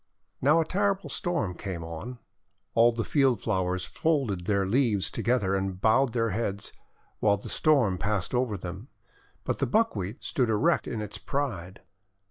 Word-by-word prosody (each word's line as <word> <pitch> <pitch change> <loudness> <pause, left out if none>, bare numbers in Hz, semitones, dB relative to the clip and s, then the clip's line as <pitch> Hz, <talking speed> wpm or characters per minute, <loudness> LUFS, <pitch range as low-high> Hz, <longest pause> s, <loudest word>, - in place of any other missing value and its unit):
Now 150 +5 +5
a 165 - +2
terrible 200 +2 0
Storm 170 - -1
came 90 -2 -5
on. 85 +10 -7 0.6
All 115 +1 +5
the 115 -1 -2
field 135 -5 +2
flowers 90 -1 -1
folded 130 - -1
their 100 -2 +2
leaves 105 -2 +2
together, 115 -5 +1
and 95 -1 -2
bowed 115 +4 +3
their 115 -2 +1
heads, 100 -1 -2 0.5
while 100 -1 +3
the 100 - -8
Storm 125 - +3
passed 100 -2 -1
over 120 -4 0
them. 95 +6 -7 0.6
But - - -2
the - - +1
Buckwheat 115 - 0
stood 125 -4 0
erect 140 +11 +2
in 110 -3 -3
its 105 -2 -6
pride. 95 -6 -3
110 Hz, 155 wpm, -28 LUFS, 95-135 Hz, 0.6 s, Now